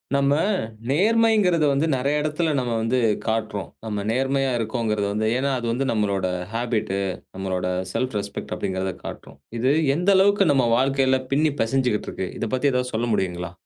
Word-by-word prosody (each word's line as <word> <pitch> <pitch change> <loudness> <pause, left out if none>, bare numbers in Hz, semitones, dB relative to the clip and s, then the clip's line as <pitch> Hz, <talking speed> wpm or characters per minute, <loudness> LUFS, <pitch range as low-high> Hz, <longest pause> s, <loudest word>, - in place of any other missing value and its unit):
நம்ம 140 0 +3 0.6
நேர்மைங்கிறத 205 -1 +3
வந்து 140 +4 +1
நெறைய 140 +3 +1
எடத்துல 155 +1 0
நம்ம 125 -2 -2
வந்து 115 +3 +1 0.3
காட்டுறோம். 110 -3 -2 0.2
நம்ம 105 -2 -3
நேர்மையா 135 +2 +1
இருக்கோங்கிறத 110 -2 -1
வந்து, 110 +1 0
ஏன்னா 135 +2 0
அது 120 - -4
வந்து 130 +4 -1
நம்மளோட 100 -4 0 0.3
ஹாபிட்டு 115 -4 -1 0.4
நம்மளோட 95 -1 -2 0.2
ஸெல்ப் 130 -1 -1
ரெஸ்பெக்ட் 100 0 -6
அப்படிங்கிறத 95 0 -2
காட்டும். 70 - -9 0.2
இது 130 +3 +3 0.3
எந்த 180 +3 +1
அளவுக்கு 200 +1 +4
நம்ம 130 -3 +3
வாழ்க்கையில 135 0 +2
பின்னிப் 150 0 +1
பெசஞ்சிக்கிட்டு 125 -1 0
இருக்கு. 95 - -4
இதப் 110 - -3
பத்தி 140 +2 +2
ஏதாவது 125 0 -1
சொல்ல 115 +2 0
முடியுங்களா? 90 -3 -2
125 Hz, 155 wpm, -23 LUFS, 105-140 Hz, 0.6 s, அளவுக்கு